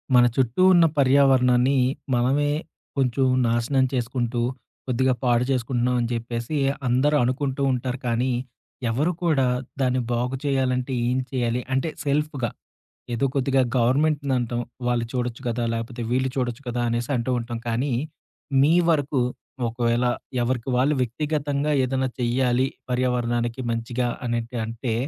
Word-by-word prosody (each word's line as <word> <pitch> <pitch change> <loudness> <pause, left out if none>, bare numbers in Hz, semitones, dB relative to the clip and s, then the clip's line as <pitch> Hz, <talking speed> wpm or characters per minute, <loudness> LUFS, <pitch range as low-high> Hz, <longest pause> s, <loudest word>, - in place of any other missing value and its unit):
మన 125 - +7
చుట్టూ 130 +5 +1
ఉన్న 170 -2 +6
పర్యావరణాన్ని 135 -1 +4 0.4
మనమే 135 +4 +2 0.5
కొంచెం 130 0 +2 0.2
నాశనం 120 +3 +2
చేసుకుంటూ, 120 -1 -1 0.5
కొద్దిగా 130 +1 +2
పాడు 120 0 +3
చేసుకుంటున్నాం 125 -1 0
అని 120 - -1
చెప్పేసి, 115 +4 -3 0.3
అందరూ 130 +5 +3
అనుకుంటూ 135 +2 -1
ఉంటారు. 125 +1 -3
కానీ, 120 +2 +1 0.6
ఎవరు 145 +10 +1
కూడా 150 -6 +3 0.4
దాన్ని 130 -1 +2
బాగు 125 +2 -1
చేయాలంటే 130 -2 0 0.2
ఏం 125 - +1
చేయాలి? 125 -2 0
అంటే 135 +5 +1 0.2
సెల్ఫ్‌గా. 145 -4 0 0.6
ఏదో 120 +4 +1
కొద్దిగా 135 0 +2 0.2
గవర్నమెంట్‌ని 140 +3 +2
అంటాం. 120 0 -2 0.3
వాళ్ళు 120 -1 +1
చూడొచ్చు 125 -1 -2
కదా! 120 +1 -1
లేకపోతే 115 +1 -4
వీళ్ళు 130 +1 +1
చూడొచ్చు 125 -1 -2
కదా! 120 0 -1
అనేసి 120 +2 -2
అంటూ 120 +2 -1
ఉంటాం. 120 0 -5
కానీ, 125 +4 0 0.7
మీ 150 +4 +5 0.2
వరకు 145 -4 +1 0.5
ఒకవేళ 120 +1 0 0.4
ఎవరికి 120 +1 -1
వాళ్ళు 135 +4 +3
వ్యక్తిగతంగా 145 +3 -1
ఏదైనా 130 0 0
చెయ్యాలి, 125 +1 +2 0.2
పర్యావరణానికి 120 -1 0
మంచిగా 120 +2 -2 0.2
అనేటి 120 0 -2
అంటే, 115 +1 -3
125 Hz, 125 wpm, -24 LUFS, 120-135 Hz, 0.7 s, మన